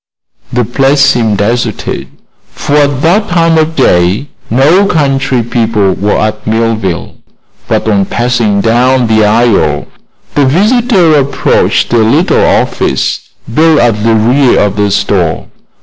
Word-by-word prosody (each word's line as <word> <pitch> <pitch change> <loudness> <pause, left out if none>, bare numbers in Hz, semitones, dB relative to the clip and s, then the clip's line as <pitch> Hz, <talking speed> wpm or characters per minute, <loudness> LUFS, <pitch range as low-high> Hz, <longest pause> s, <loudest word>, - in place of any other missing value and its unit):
The 125 -1 -1
place 135 +4 +1
seemed 115 -6 +1
deserted, 115 +2 -3 0.5
for 145 - -4
at 145 -2 +1
that 190 +6 +1
time 165 -2 +2
of 160 +1 -1
day 90 - +1 0.2
no 155 - +2
country 135 - 0
people 110 -4 0
were 105 +2 -1
at 110 0 -3
Millville; 110 -5 -2 0.5
but - - -1
on 100 -3 +1
passing 120 -4 -1
down 125 +3 +1
the 110 -1 +2
aisle 110 +1 +1 0.5
the 145 - +1
visitor 195 - +2
approached 140 -3 0
a 120 - +3
little 110 0 +2
office 65 - -1 0.2
built 160 +3 +3
at 110 -3 0
the 115 0 +2
rear 125 +4 +2
of 105 - 0
the 105 -1 0
store. 90 -4 -1
120 Hz, 135 wpm, -9 LUFS, 110-145 Hz, 0.5 s, a